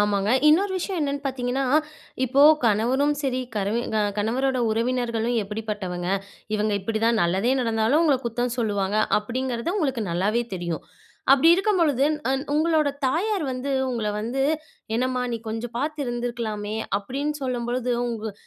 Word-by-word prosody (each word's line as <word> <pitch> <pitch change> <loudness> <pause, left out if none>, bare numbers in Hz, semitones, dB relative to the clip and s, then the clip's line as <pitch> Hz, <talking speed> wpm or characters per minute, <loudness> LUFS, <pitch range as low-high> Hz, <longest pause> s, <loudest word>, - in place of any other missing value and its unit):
ஆமாங்க, 205 0 +1 0.2
இன்னொரு 380 +6 +4
விஷயம் 370 0 -3
என்னென்னு 280 -1 -1
பாத்தீங்கன்னா, 260 0 -1 0.6
இப்போ 270 +3 +3 0.2
கணவனும் 245 +7 +2
சரி, 255 -2 0 0.2
கரவி 205 +3 0 0.4
கணவரோட 255 +5 0
உறவினர்களும் 235 0 0
எப்படிப்பட்டவங்க 205 -4 -4 0.5
இவங்க 215 0 0
இப்டிதான் 225 +3 +1
நல்லதே 190 +8 +2
நடந்தாலும் 225 +5 +2
உங்கள 300 -5 +4
குத்தம் 240 +1 -1
சொல்லுவாங்க. 205 -3 0 0.2
அப்படிங்கிறது 245 - -3
உங்களுக்கு 270 - 0
நல்லாவே 205 +7 +1
தெரியும். 170 -3 -3 0.5
அப்டி 280 +4 +5
இருக்கும்பொழுது 345 - +2 0.3
அந் 270 +1 0
உங்களோட 310 -1 +3 0.2
தாயார் 375 +8 0
வந்து 255 +2 -3 0.2
உங்கள 230 -4 -2
வந்து" 240 +5 -1 0.5
என்னம்மா 250 +1 0
நீ 230 - 0
கொஞ்சம் 225 +2 -5
பாத்து 300 +3 -2
இருந்திருக்கலாமே." 235 -4 -3 0.2
அப்டின்னு 275 +8 -3
சொல்லும் 250 -2 -2
பொழுது 250 0 -1 0.2
உங்க 220 -2 -4
240 Hz, 130 wpm, -24 LUFS, 220-270 Hz, 0.6 s, அப்டி